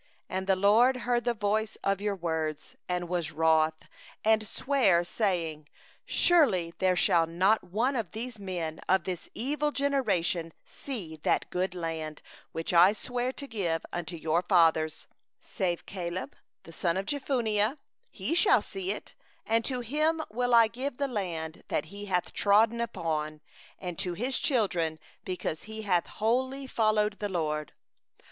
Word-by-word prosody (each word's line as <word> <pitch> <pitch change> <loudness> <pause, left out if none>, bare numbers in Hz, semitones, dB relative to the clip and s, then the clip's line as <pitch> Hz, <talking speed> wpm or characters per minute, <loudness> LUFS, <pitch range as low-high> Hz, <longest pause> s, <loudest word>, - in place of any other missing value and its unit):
34And 190 0 -2
the 190 - +4
LORD 220 +7 +5
heard 240 -1 0
the 240 - +2
voice 215 +1 -1
of 195 0 +1
your 205 -1 0
words, 160 -4 -3
and 180 -1 -1
was 175 -2 -2
wroth, 160 0 +2 0.4
and 220 -1 +3
swore, 225 -9 +2
saying: 170 -6 -1 0.4
35'Surely 195 - +3
there 185 -1 +3
shall 170 -2 +3
not 190 +6 +2
one 230 +9 0
of 225 -7 -2
these 230 +1 -6
men, 175 -5 -4
even 190 -2 +4
this 180 -2 -5
evil 295 +5 -1
generation, 185 - 0
see 190 - -7
the - - +3
good 185 +1 -1
land, 160 -3 -4 0.3
which 165 +2 -3
I 175 +4 +7
swore 245 +3 -2
to 280 - -6
give 180 - -2
unto 175 0 -4
your 160 +1 +1
fathers, 160 -4 +3 0.4
36save 180 -5 -2
Caleb 180 -1 -5 0.3
the 165 - -12
son 170 +1 0
of 195 - -2
Jephunneh, 240 -4 0 0.3
he - - -3
shall 390 +5 +5
see 380 -1 -5
it; - - -7 0.3
and 225 +1 +2
to 255 -2 -1
him 305 +7 +1
will 245 +2 +2
I 230 -1 +7
give 250 +3 -5
the 280 - 0
land 170 -9 -4
that - - -1
he 205 0 -7
hath 180 -3 -1
trodden 220 +3 +3
upon, 155 -9 -2 0.4
and 180 -3 -6
to 180 -2 -2
his 255 +7 -1
children; 180 - +1 0.3
because 180 -4 -4
he 220 0 -7
hath 180 -4 +1
wholly 260 +5 0
followed 215 -4 +1
the 205 - -2
LORD. 150 -4 -2
195 Hz, 155 wpm, -29 LUFS, 170-235 Hz, 0.4 s, I